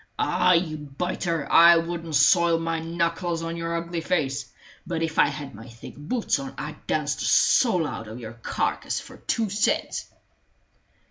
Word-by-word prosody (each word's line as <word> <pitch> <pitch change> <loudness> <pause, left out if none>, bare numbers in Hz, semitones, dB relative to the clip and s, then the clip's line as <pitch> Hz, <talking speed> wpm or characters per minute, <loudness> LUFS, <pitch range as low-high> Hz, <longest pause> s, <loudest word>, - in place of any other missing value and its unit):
Ah, 180 0 +3
you 165 -3 +1
biter, 160 +2 -3
I 170 0 +8
wouldn't 165 -1 -3
soil 165 +4 +5
my 165 0 -2
knuckles 170 +1 -2
on 165 0 -4
your 165 0 -3
ugly 170 0 -4
face; 155 -6 -1 0.4
but 165 -2 -2
if 160 -1 -2
I - - +6
had 140 -1 -6
my 110 +3 -11
thick 115 0 -12
boots 210 - -1
on 270 -1 -7
I'd - - -8
dance - - 0
the - - -5
soul 185 -10 +4
out 115 -6 -6
of 110 +3 -8
your 110 -1 -8
carcass 120 - -2
for - - -12
two 220 -4 -2
cents!" 205 +2 0
165 Hz, 170 wpm, -25 LUFS, 150-175 Hz, 0.4 s, I